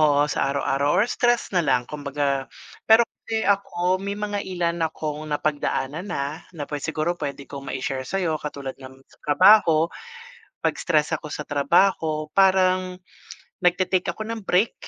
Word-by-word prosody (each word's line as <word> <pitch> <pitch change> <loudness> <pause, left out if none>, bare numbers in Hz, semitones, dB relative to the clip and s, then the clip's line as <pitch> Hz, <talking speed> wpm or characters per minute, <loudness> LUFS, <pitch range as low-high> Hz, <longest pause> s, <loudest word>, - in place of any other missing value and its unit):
Oo, 145 -1 +4
sa 135 - 0
araw-araw 140 0 0
or - - +5
stress 240 0 +1
na 180 - +4
lang 125 -2 +3
kumbaga 140 -2 -2 0.4
pero 225 +2 +8 0.2
kasi 220 -1 -1
ako 185 -2 +1
may 200 +1 -4
mga 205 0 -3
ilan 170 -2 -1
akong 155 -1 -5
napagdaanan 150 +2 -2
na 145 -3 -4
na 150 - -6 0.2
siguro 155 +4 -2
pwede 140 -1 -4
kong 140 -1 -8
ma-share 130 0 -3
sayo 170 -4 -1
katulad 140 -2 -6
ng 130 0 -12 0.3
trabaho 165 0 +5 0.7
'pag - - +2
stress 155 -3 +1
ako 150 - -3
sa 150 0 -5
trabaho 155 +1 +2
parang 185 -1 +3 0.6
nagte-take 180 0 +1
ako - - -6
ng 220 -2 -6
break, 190 +6 +2
160 Hz, 145 wpm, -24 LUFS, 145-185 Hz, 0.7 s, pero